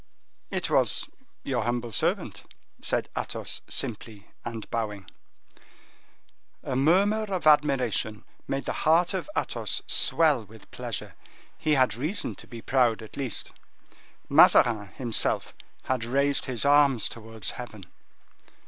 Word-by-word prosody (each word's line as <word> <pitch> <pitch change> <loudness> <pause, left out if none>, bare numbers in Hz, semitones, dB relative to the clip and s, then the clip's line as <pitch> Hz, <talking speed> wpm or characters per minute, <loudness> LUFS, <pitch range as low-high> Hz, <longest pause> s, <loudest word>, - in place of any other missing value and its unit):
"It - - -2
was - - +2 0.4
your 130 -3 -1
humble 120 +1 -2
servant," - - 0 0.4
said - - 0
Athos, - - -3
simply, 105 -2 -3
and 115 -2 -6
bowing. 105 -4 -3 1.6
A 130 - -3
murmur 195 +10 +3
of 190 -5 -3
admiration 135 -8 +2 0.2
made 135 0 -2
the - - -3
heart 170 +4 +3
of 190 +10 -3
Athos - - -2
swell 155 -8 +3
with 110 +1 -16
pleasure. - - -5 0.4
He 155 -1 +1
had 130 -2 +3
reason 150 - -2
to - - -9
be 115 -1 -10
proud, 120 -4 +2
at 110 - -11
least. 130 -7 -4 0.8
Mazarin, 110 -4 +5
himself, 115 +4 -1 0.3
had 130 -3 -1
raised 140 +4 +1
his 130 -1 -2
arms 140 -5 +4
towards 115 -3 -6
heaven. 110 -6 -9
125 Hz, 120 wpm, -27 LUFS, 115-145 Hz, 1.6 s, Mazarin